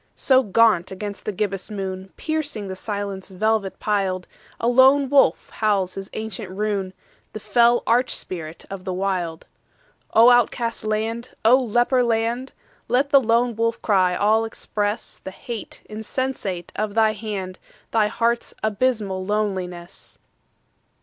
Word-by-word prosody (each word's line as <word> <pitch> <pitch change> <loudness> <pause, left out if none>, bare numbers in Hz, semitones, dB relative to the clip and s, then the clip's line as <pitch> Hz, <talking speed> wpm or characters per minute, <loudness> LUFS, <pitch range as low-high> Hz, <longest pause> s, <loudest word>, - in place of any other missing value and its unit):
So 260 -1 +4
gaunt 215 -5 +3
against 200 +1 -7
the - - -1
gibbous 195 -1 -3
moon, 190 -2 -5
Piercing 300 -10 -3
the 190 - -4
silence 200 -1 -5
velvet 210 +1 0
piled, 190 -3 -1 0.3
A 230 - 0
lone 265 +3 +5
wolf 270 - +3
howls 200 -4 0
his 195 0 -7
ancient 220 -2 -5
rune— 195 -1 -2 0.4
The 215 - -5
fell 235 +3 +3
arch 245 +3 +3
spirit 165 -3 -6
of 195 -2 -6
the 185 -1 -3
Wild. 180 -4 -2 0.7
O 230 +2 +8
outcast 240 -1 +1
land! 220 +3 -2
O 235 +3 +8
leper 250 0 +2
land! 235 +2 0 0.4
Let 265 +4 +1
the 275 - +7
lone 235 0 +2
wolf 230 +1 0
cry 185 -4 +3
all 215 +3 +3
express 210 -1 -3
The - - -7
hate 225 +3 -8
insensate 215 -5 -4
of 210 0 -2
thy 220 -1 +4
hand, 200 -4 -5 0.3
Thy 220 -2 +3
heart's 235 +2 -1
abysmal 210 -3 0
loneliness. 185 -4 -4
215 Hz, 135 wpm, -22 LUFS, 190-235 Hz, 0.7 s, O